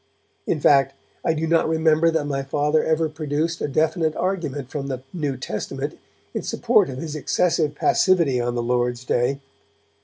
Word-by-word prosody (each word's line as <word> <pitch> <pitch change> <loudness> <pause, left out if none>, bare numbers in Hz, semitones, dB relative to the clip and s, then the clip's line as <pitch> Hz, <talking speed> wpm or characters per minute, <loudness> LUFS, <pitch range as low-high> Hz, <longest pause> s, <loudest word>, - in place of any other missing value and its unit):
In 155 - 0
fact, 140 -1 +4 0.3
I 160 - +1
do 160 +1 -1
not 165 0 +2
remember 160 0 +3
that 160 -2 0
my 140 -1 -2
Father 150 +3 +1
ever 160 0 +1
produced 155 +2 -2
a - - 0
definite 160 +2 +1
argument 150 -8 -3
from 140 -2 -4
the 130 -2 -4
New 145 -6 -2
Testament 130 - -5 0.3
in - - -2
support - - +2
of 130 - -6
his 155 +2 -5
excessive 155 -1 +1
passivity 165 -8 +3
on 120 0 -2
the 120 - -1
Lord's 120 0 0
Day. 130 +3 0
150 Hz, 165 wpm, -23 LUFS, 135-160 Hz, 0.3 s, fact